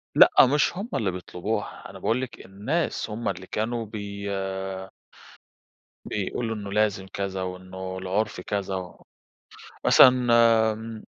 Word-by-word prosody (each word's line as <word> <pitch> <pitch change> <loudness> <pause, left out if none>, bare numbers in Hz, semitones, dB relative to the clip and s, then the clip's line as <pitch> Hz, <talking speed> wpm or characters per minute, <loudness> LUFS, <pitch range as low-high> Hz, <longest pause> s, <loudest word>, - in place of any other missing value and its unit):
لأ، - - +8 0.2
مش 150 +4 +2
هُم 215 +5 -4
اللي 100 -4 0
بيطلبوها، 90 -1 -4
أنا - - -10
باقول 125 +3 0
لِك 130 - -7
الناس 110 - -2
هُم 110 +3 -2
اللي 95 -1 -5
كانوا 115 +1 -2
بي 100 -1 -6 1.8
بيقولوا 110 +3 -2
إنّه 100 -1 -6
لازم 105 -2 +1
كذا، 95 -1 -3
وإنّه 95 0 -6
العُرف 95 +1 -2
كذا، 95 -2 -3 0.9
مثلًا 125 -1 +7 0.5
آمم. 110 0 -8
100 Hz, 120 wpm, -26 LUFS, 95-115 Hz, 1.8 s, لأ